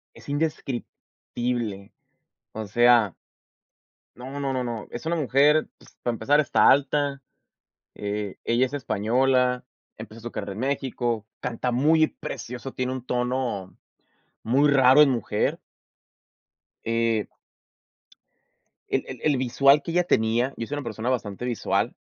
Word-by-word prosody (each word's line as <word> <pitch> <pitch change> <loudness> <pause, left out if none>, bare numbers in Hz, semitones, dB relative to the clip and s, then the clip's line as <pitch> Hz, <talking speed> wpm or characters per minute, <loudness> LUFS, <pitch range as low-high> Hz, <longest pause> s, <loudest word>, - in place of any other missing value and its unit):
Es - - -13
indescriptible. 120 -7 -4 0.6
O 110 0 -5
sea 120 -2 +4 1.0
no, 130 +3 -7
no, 135 -1 -1
no, 130 -1 -1
no. 115 -3 -5
Es 120 - -7
una 165 +1 0
mujer. 150 +1 +3
Ps - - -20
para 120 - 0
empezar, 135 +6 +2
está 150 - +4
alta, 140 0 +2 0.7
eh, 105 -1 -4
ella 120 +3 +2
es 130 - -9
española, 125 +1 +1 0.3
empezó 110 +1 -10
su 120 +1 -6
carrera 100 -3 -5
en 95 - -8
México, 120 -4 -2
canta 125 0 -2
muy 155 +5 +4
precioso, 125 +2 -7
tiene 130 0 -2
un 130 -1 -6
tono 125 -6 -2 0.7
muy 140 +6 +3
raro 135 0 +6
en 145 - +7
mujer. 115 -4 -1 1.3
Eh 115 -2 +1 1.6
el - - 0
el - - -8
el 145 -3 +2
visual 135 +3 +4
que - - -4
ella 180 +1 +2
tenía, 120 -2 +1
yo 115 - -4
soy 145 - -4
una 145 - -4
persona 115 +1 -3
bastante 110 -2 -2
visual, 120 -4 -1
125 Hz, 135 wpm, -25 LUFS, 115-140 Hz, 1.6 s, en